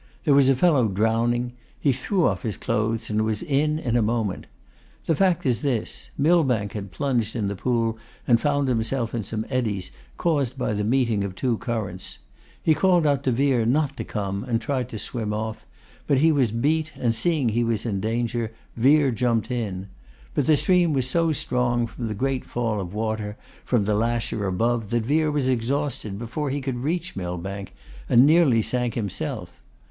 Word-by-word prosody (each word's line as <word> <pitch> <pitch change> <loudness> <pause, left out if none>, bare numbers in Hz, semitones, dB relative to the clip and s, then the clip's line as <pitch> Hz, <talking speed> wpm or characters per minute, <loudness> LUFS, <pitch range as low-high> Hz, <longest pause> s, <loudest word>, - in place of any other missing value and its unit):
There 150 - +4
was 140 -1 +5
a 135 - +5
fellow 140 -5 +4
drowning. 115 +4 +1 0.3
He 140 - +3
threw 180 - 0
off - - +1
his 110 -7 -3
clothes 110 +1 -1
and 105 0 +1
was 110 +4 -1
in 150 -1 +1
in 125 -7 -1
a 120 - +4
moment. 110 -3 -1 0.6
The 165 - +2
fact 180 -2 +2
is 125 -3 +1
this, 130 -7 -2
Millbank 140 - +2
had 100 -2 -5
plunged 120 -2 -1
in 110 -4 -1
the 100 - -2
pool 115 +1 0 0.3
and 120 -2 +4
found 145 -1 +1
himself 115 0 -1
in 115 -2 -2
some 110 +2 -4
eddies, 110 -8 -2 0.3
caused 140 -7 0
by 125 - -1
the 105 0 -1
meeting 115 -3 +1
of 95 -2 -4
two 125 +2 0
currents. 105 -7 -4 0.5
He 160 - +4
called 175 +1 +3
out 140 -2 +2
to 130 - +3
Vere 130 -1 +2
not 140 +4 +1
to - - -3
come, 100 -1 -3
and 115 -3 0
tried 130 +1 -2
to 115 - -6
swim 110 -1 -3
off. 110 +1 -5 0.4
But 140 - +3
he 160 +4 +5
was 135 -7 +2
beat, 155 +7 0
and 120 -2 +1
seeing 140 +1 +1
he 120 +2 +1
was 115 -1 -1
in 100 -4 -1
danger, 115 +1 -1 0.2
Vere 140 +3 +4
jumped 115 0 0
in. 100 -6 -3 0.5
But - - 0
the 155 -2 +5
stream 180 -3 +3
was 130 -2 +1
so 165 +4 +2
strong, 125 -4 0
from 115 0 -6
the 105 - -3
great 135 +4 -1
fall 115 -3 -2
of 90 -2 -6
water 110 -1 -2 0.3
from 115 -5 +1
the 105 - +1
lasher 115 -1 0
above, 115 +3 0
that 120 -1 0
Vere 155 +4 +2
was 145 -3 0
exhausted 125 -4 -1
before 120 +6 -3
he 140 +2 -1
could 130 -2 -3
reach 165 +7 -2
Millbank, 95 0 -5 0.3
and 120 +3 +7
nearly 145 -8 +5
sank 125 -1 -1
himself. 105 -5 -4
120 Hz, 190 wpm, -24 LUFS, 110-140 Hz, 0.6 s, and